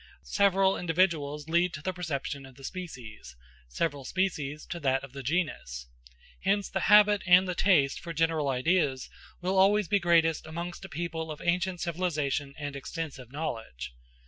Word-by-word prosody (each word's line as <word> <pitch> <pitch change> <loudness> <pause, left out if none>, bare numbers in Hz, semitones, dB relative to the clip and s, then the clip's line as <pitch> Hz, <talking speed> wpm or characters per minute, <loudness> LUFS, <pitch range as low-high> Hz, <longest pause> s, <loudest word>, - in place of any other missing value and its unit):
Several 195 -1 +3
individuals 160 -4 0
lead 170 +2 +2
to 150 - -8
the 185 - -1
perception 145 -5 -4
of 130 - -16
the 135 - -15
species; 125 - -8 0.3
several 145 - -2
species 155 -4 -2
to 170 - -5
that 135 -3 +1
of 135 -1 -10
the 140 - -6
genus. 135 - -2 0.5
Hence 200 +1 +1
the 190 - 0
habit 210 -1 +7
and 180 +1 +7
the 180 - -1
taste 170 -7 +3
for 170 - -7
general 160 -2 +1
ideas 135 0 +1 0.3
will 190 +1 +1
always 205 0 +4
be 200 +4 +3
greatest 165 -3 +3
amongst 170 +3 -6
a - - -9
people 160 0 -4
of 155 - -6
ancient 180 +1 0
cultivation 150 -5 -1
and 145 -1 -5
extensive 140 -3 -6
knowledge. 110 - -5
165 Hz, 160 wpm, -29 LUFS, 140-180 Hz, 0.5 s, habit